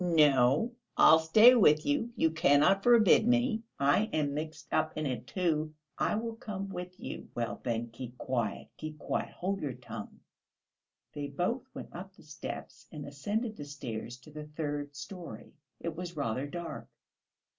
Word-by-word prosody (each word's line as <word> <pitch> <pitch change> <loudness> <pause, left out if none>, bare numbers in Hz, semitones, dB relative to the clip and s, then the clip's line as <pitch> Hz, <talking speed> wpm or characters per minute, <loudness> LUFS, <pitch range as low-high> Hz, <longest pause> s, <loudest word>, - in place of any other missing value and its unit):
"No, 150 - +4 0.3
I'll 160 - +8
stay 215 +10 +7
with 155 -10 +5
you; 290 -5 0
you 160 -8 +2
cannot 160 +4 +4
forbid 230 -1 +6
me; 245 -2 +2 0.2
I 145 +10 +3
am 145 -2 0
mixed 155 0 -6
up 155 - +1
in 155 - -1
it, 130 -3 -3
too; 155 -4 -1 0.2
I - - +1
will 225 +1 -3
come 195 -3 -5
with 180 -1 -7
you...." - - -7
"Well, 120 -1 -3
then, 120 -1 -2
keep 120 +1 -8
quiet, 120 -4 -2
keep 155 -1 -6
quiet, - - -2
hold 195 +2 -3
your 140 -4 -2
tongue...." 115 -4 -9 0.9
They 145 -1 -4
both 180 - -2
went - - -8
up 190 +2 -8
the - - -18
steps 150 0 -8
and 150 -3 -7
ascended 205 - -3
the 145 - -6
stairs 120 -4 -6
to 155 - -15
the 150 0 -8
third 145 -2 -4
storey. 155 - -9 0.3
It 170 -2 -4
was 175 -1 -6
rather 135 0 -1
dark. 170 +3 -6
155 Hz, 165 wpm, -31 LUFS, 140-195 Hz, 0.9 s, I'll